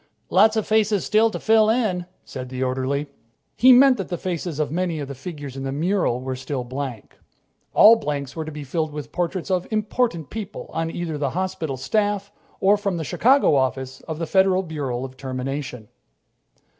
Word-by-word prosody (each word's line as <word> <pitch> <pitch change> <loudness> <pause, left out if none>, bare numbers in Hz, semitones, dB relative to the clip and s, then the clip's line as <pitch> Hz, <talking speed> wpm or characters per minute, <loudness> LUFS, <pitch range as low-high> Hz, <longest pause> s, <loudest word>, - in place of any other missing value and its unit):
"Lot 215 +4 +5
of 220 - 0
faces 215 -2 +2
still 220 +1 +4
to - - -5
fill 220 -1 +4
in," 210 -7 0 0.2
said 130 0 -7
the 130 0 -3
orderly. 130 +3 -1 0.5
He 255 +3 +6
meant 255 +1 +7
that 195 - -4
the 175 - -2
faces 170 -3 -4
of 150 -2 -1
many 175 0 -1
of 145 - -4
the 140 - -6
figures 145 -1 -8
in 135 - -5
the 135 0 -3
mural 160 -4 0
were 130 0 -3
still 130 0 -4
blank. 130 -2 -6 0.6
All 225 +2 +8
blanks 145 - -4
were 160 - -3
to 155 - -7
be 150 -1 -7
filled 155 +3 -2
with 150 -1 -7
portraits 180 +2 -2
of 185 -1 0
important 215 - -1
people 215 -3 -7
on 165 +1 -1
either 165 -3 -4
the 140 -2 0
hospital 185 -7 -2
staff 205 - -1 0.3
or 200 +2 +4
from 200 -3 -2
the 160 - -3
Chicago 255 - +3
Office 130 -1 -1
of 160 - -4
the 165 - -2
Federal 190 +1 +3
Bureau 140 -7 -3
of 130 0 -11
Termination. 130 -2 -5
160 Hz, 190 wpm, -23 LUFS, 135-200 Hz, 0.6 s, All